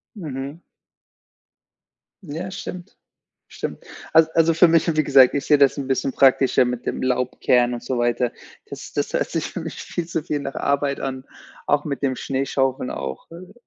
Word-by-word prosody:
Mhm. 145 -3 -6 1.6
Ja, 170 +4 -6
stimmt. 180 0 -8 0.5
Stimmt. - - -6 0.3
Al 160 0 +6
also, 165 0 +4
für 175 +2 +6
mich, 165 0 +3
wie 155 - +3
gesagt, 135 -2 +6
ich 140 - -1
sehe 150 - +4
das 140 -2 +4
'n 140 -2 -4
bisschen 135 0 -1
praktischer 130 -1 +4
mit 125 0 -4
dem - - -2
Laub 125 -1 -1
kehren 125 -1 +3
und 120 - -7
so 130 -2 -2
weiter. 120 0 0 0.4
Das - - -8
das - - -2
hört - - 0
sich - - -2
für - - -5
mich - - -6
viel 175 - -5
zu 165 -2 -3
viel 150 -2 -2
nach 135 -1 -5
Arbeit 140 0 0
an, 130 -1 -4 0.4
auch 145 0 +2
mit 140 -2 -4
dem 130 -2 0
Schneeschaufeln 135 -1 -1
auch, 65 -1 -6
äh 180 +3 -11
140 Hz, 180 wpm, -22 LUFS, 130-160 Hz, 1.6 s, Al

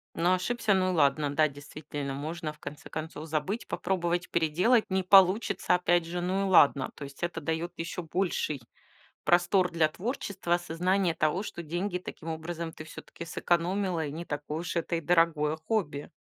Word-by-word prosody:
Ну 175 +2 +2
ошибся, 220 +3 +1
ну 185 -1 +2
и - - 0
ладно. 145 -1 +3
Да, 155 +1 +4
действительно, 145 0 -6
можно 155 +2 -4
в 150 - -21
конце 145 - -9
концов 155 0 -6
забыть, 160 +9 -2
попробовать 175 -1 -1
переделать, 180 +9 +3
не 190 0 +1
получится 190 0 +5
опять 175 -1 +2
же, 175 +1 -3
ну 185 +2 0
и - - -1
ладно. 140 -6 +5
То 145 - -8
есть, 140 +2 -11
это 170 -1 -2
даёт 160 +3 -2
ещё 170 +2 -4
больший 165 -4 -1 0.6
простор 180 +1 +3
для 165 -2 +3
творчества, 190 - -2
осознание 175 +1 +1
того, 155 +4 +1
что 175 - -6
деньги 175 +4 -2
таким 165 -2 -9
образом 165 +1 -4
ты 155 - -9
всё-таки 160 +1 -9
сэкономила 175 0 0
и 140 - -5
не 165 +3 -5
такое 150 0 -4
уж 175 0 -4
это 170 0 0
и - - -2
дорогое 160 -2 +2
хобби. 160 -4 -2
170 Hz, 175 wpm, -29 LUFS, 155-185 Hz, 0.6 s, получится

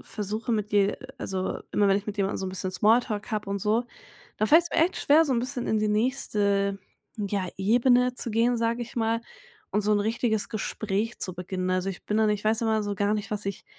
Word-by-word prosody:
versuche 215 +2 -3
mit 210 -1 -1
je 200 -1 +4
äh, - - -10
also 190 -1 -3
immer 205 -1 +3
wenn 195 - +4
ich 200 - -4
mit 210 -1 -5
jemandem 195 -1 0
so 190 - -3
'n - - -3
bisschen 185 0 -1
Small 220 +5 +4
Talk 215 -4 -5
hab 210 -1 -2
und 200 0 -1
so, 220 +5 +1 0.5
da 215 - +1
fällt's 335 +5 +5
mir - - -2
echt 365 - -3
schwer 310 +3 +4
so 280 - 0
'n 235 - +1
bisschen 250 0 -3
in 220 - +1
die 215 - +1
nächste, 205 -3 +1 0.4
ja, 200 -3 -2
Ebene 245 +5 +3
zu 240 - -1
gehen, 230 +3 +2
sage 230 +1 0
ich 240 - -9
mal, 225 0 +1 0.5
und 210 - +2
so 210 - +1
'n 210 - +3
richtiges 220 0 0
Gespräch 215 +1 -3
zu 185 - 0
beginnen. 185 +1 -3
Also, 185 +1 0
ich 185 - -9
bin 210 - 0
dann 220 -1 +3
ich 210 0 -2
weiß 220 +1 +2
immer 220 -1 +1
so 205 0 -2
gar 205 +2 +1
nicht, 210 -1 -4
was 210 -1 -3
ich, 200 - -4
210 Hz, 240 wpm, -26 LUFS, 200-230 Hz, 0.5 s, fällt's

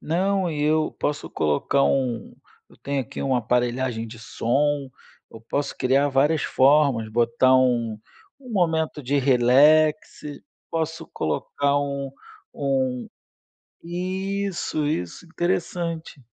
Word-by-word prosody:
Não, 190 +2 0
e 150 -2 -3
eu 155 +1 +1
posso 145 0 -2
colocar 80 - +1
um 125 -5 -1 0.3
eu - - -20
tenho 140 0 -2
aqui 120 - -7
uma 130 -2 +1
aparelhagem 120 0 -1
de 110 0 -11
som, 140 +5 -1 0.4
eu 115 - -12
posso 140 +5 -3
criar 135 +3 +2
várias 145 +3 +2
formas, 135 -4 +3
botar 120 +3 +3
um 120 -4 +1 0.4
um 255 - -12
momento 160 -5 0
de 140 +3 0
relax, 140 +4 +4 0.5
posso 160 0 -3
colocar 140 - -1
um 140 -1 -3 0.4
um 130 -3 -1 0.7
isso, 185 -1 -3
isso, 90 - -3
interessante. 170 -3 -3
140 Hz, 115 wpm, -24 LUFS, 125-160 Hz, 0.7 s, relax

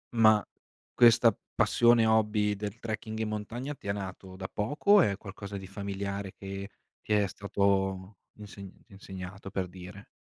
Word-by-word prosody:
Ma 110 -2 +6 0.5
questa 115 -2 +6 0.2
passione, 120 -1 +4
hobby, 105 -1 +2
del 100 +1 -5
trekking 110 -1 -5
in 110 -1 -2
montagna, 120 +7 -4
ti 100 - -12
è - - +1
nato 95 -1 -7
da 95 0 -5
poco 145 - -1
o 205 -2 +9
è 100 - +1
qualcosa 100 -1 -8
di 95 - -8
familiare 100 0 -5
che 100 0 -7 0.3
ti 105 - -2
è 105 -1 +4
stato 95 0 -1 0.2
insegnent 100 -2 -12
insegnato? 95 0 -9
Per 95 -2 -2
dire. 90 +2 -11
100 Hz, 155 wpm, -29 LUFS, 95-110 Hz, 0.5 s, o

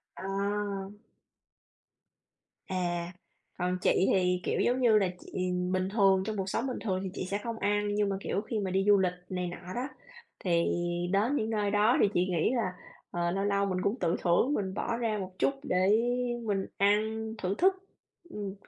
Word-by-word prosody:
Ờ. - - -8 2.4
À. 175 -1 -2 0.5
Còn 180 0 0
chị - - +4 0.2
thì, 180 -1 +2
kiểu, - - 0
giống 250 +2 +2
như 225 -4 +5
là, 195 - +2
chị 185 0 -3 0.2
bình 185 0 0
thường, 195 -3 +4
trong 215 -1 -2
cuộc 190 -1 -2
sống 235 +7 -1
bình 255 - -3
thường 190 -4 0
thì 190 - -3
chị - - -4
sẽ 200 - 0
không 230 -1 -3
ăn, 205 0 +1
nhưng 205 -1 +2
mà, 195 - -1
kiểu, 195 - -1
khi 225 0 -3
mà 190 - -2
đi 190 +1 +1
du 205 -1 +6
lịch 180 -1 +2 0.2
này 180 -1 -2
nọ 180 +1 -8
đó, 250 +3 -2 0.6
thì 170 -2 +3 0.5
đến 225 +9 +2
những 220 -3 -1
nơi 210 -2 0
đó 210 +5 +4
thì - - +5
chị - - +3
nghĩ 170 +2 +2
là, 200 -6 0 0.4
ờ, 175 0 -1
lâu 195 +2 -1
lâu 200 0 +2
mình 185 -1 -1
cũng 205 +5 0
tự 175 -2 +1
thưởng, 185 +11 +3
mình 190 -2 -2
bỏ 230 - -1
ra 225 -3 -1
một 185 -1 -5
chút - - +3
để 185 -8 +1 0.6
mình 195 -2 0
ăn 205 +1 +4 0.4
thưởng 190 0 -1
thức, 380 +2 +5 0.6
ừm. 200 -2 -5
195 Hz, 195 wpm, -30 LUFS, 185-215 Hz, 2.4 s, du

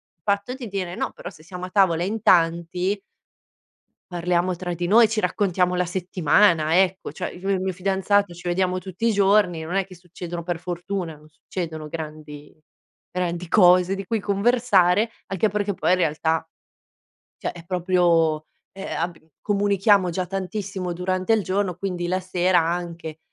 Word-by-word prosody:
il - - -54
fatto 200 +4 0
di 255 -3 -7
dire: 190 -3 -4
"No - - -2
però 175 - -8
se 155 -3 -17
siamo 180 +2 -7
a - - -8
tavola 180 -4 +3
in 210 +4 -2
tanti 175 +3 +2 1.1
parliamo 175 +1 0
tra 175 0 -4
di 175 +1 -3
noi, 225 +3 +6
ci 220 0 -1
raccontiamo 180 -1 +1
la 180 0 +1
settimana, 170 -2 +2
ecco". 190 0 -3
Cioè 185 - -4
io 185 +2 -7
e - - +3
il 190 - 0
mio 190 0 -1
fidanzato 195 +1 +1
ci 175 +1 -7
vediamo 185 +1 +1
tutti 190 +4 -4
i 230 - +3
giorni, 200 -4 +3
non 170 +4 -3
è 195 -1 +1
che 190 - -13
succedono 175 0 -7
per 175 0 -3
fortuna 175 0 -4
non 150 0 -18
succedono 160 0 -6
grandi 150 -2 -8 0.6
grandi 180 -1 -3
cose 180 0 +5
di 195 0 -5
cui 225 +4 -1
conversare. 205 -1 +2 0.2
Anche 195 +2 0
perché 205 0 -1
poi 180 - +1
in 185 - +3
realtà 160 -1 0 0.9
cioè - - -3
è 170 -1 -12
proprio, 170 -3 +2 0.3
ehm, 195 0 -8
ab 170 0 -2 0.2
comunichiamo 200 -2 +2
già 180 +2 -2
tantissimo 195 -1 -4
durante 185 +3 -1
il 220 -2 +3
giorno, 190 -1 -1
quindi 180 -1 -3
la 185 +1 0
sera 185 -1 +2
anche, 165 -1 -3
180 Hz, 170 wpm, -23 LUFS, 170-195 Hz, 1.1 s, noi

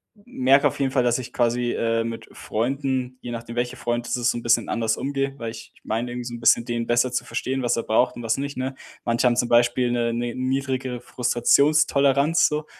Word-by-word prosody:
m 205 - -10
merke 135 +2 +6
auf - - -4
jeden 135 -1 0
Fall, 130 -2 +2
dass 120 +1 +2
ich 125 -1 -7
quasi, 120 0 +1
äh, 115 0 0
mit 115 0 -6
Freunden, 130 +2 -2
je 120 - -6
nachdem 115 0 -7
welcher 125 +1 -2
Freund 120 0 -2
es - - 0
ist 120 0 +1
so - - -4
'n 120 - -7
bisschen 115 0 +2
anders 115 -1 0
umgehe, 135 0 -2
weil 115 -1 -4
ich 115 0 -11
ich - - -24
meine 115 +3 -2
irgendwie 125 0 -5
so 120 - -6
'n - - -8
bisschen 115 0 +4
den 120 -1 -2
besser 120 +1 +2
zu 125 - 0
verstehen, 130 0 -3
was 120 -1 +1
er 115 - -1
braucht 125 +3 +2
und - - -6
was 115 -1 +1
nicht, 140 +1 -4
ne? 130 +1 -3 0.3
Manche 120 +2 +1
haben 120 - +2
zum 120 - +2
Beispiel 120 +1 +3
'ne 120 -1 0
'ne 120 0 -3
niedrigere 130 -1 -2
Frustrationstoleranz 140 +4 +3
so. 150 0 -3
120 Hz, 235 wpm, -23 LUFS, 120-135 Hz, 0.3 s, merke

